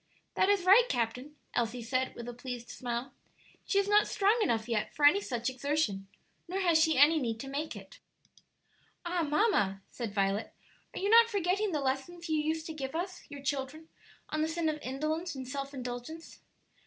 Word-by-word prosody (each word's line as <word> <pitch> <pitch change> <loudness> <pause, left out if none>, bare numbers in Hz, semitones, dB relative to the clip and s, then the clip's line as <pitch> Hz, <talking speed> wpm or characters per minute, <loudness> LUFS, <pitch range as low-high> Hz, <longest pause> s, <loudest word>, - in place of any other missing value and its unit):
"That 380 - +2
is 405 -3 +3
right, 460 +6 +7
captain," 250 +4 -2 0.2
Elsie 235 0 -1
said, 255 +2 -1
with 235 0 -7
a 245 - -5
pleased 245 -1 -7
smile. 245 +2 -4 0.5
"She 395 - +1
is 400 0 +3
not 415 +1 +4
strong 415 +4 +2
enough 230 - +1
yet 225 -3 -2
for 295 - +2
any 380 +8 +6
such 240 - -3
exertion, 260 -7 -1 0.4
nor 370 +3 -2
has 340 -4 +4
she 320 -2 +3
any 305 +4 +6
need 230 -5 -2
to 270 - -7
make 290 +3 -4
it." - - -12 1.1
"Ah, 345 0 0
mamma," 295 - +1
said 235 -4 -5
Violet, 195 +2 0 0.4
"are - - -3
you 400 +2 0
not 460 0 +8
forgetting 400 0 0
the 300 -3 -1
lessons 275 +6 -3
you 315 - +2
used 315 +1 -1
to 320 - -5
give 275 -1 -5
us, 365 +2 -3
your 285 -1 -9
children, 280 +3 -3 0.4
on 310 - -1
the 310 - +2
sin 325 0 -1
of 305 0 -3
indolence 310 +6 -3
and 260 -1 -6
self 275 +1 -4
indulgence?" 255 +5 -7
295 Hz, 190 wpm, -31 LUFS, 250-345 Hz, 1.1 s, not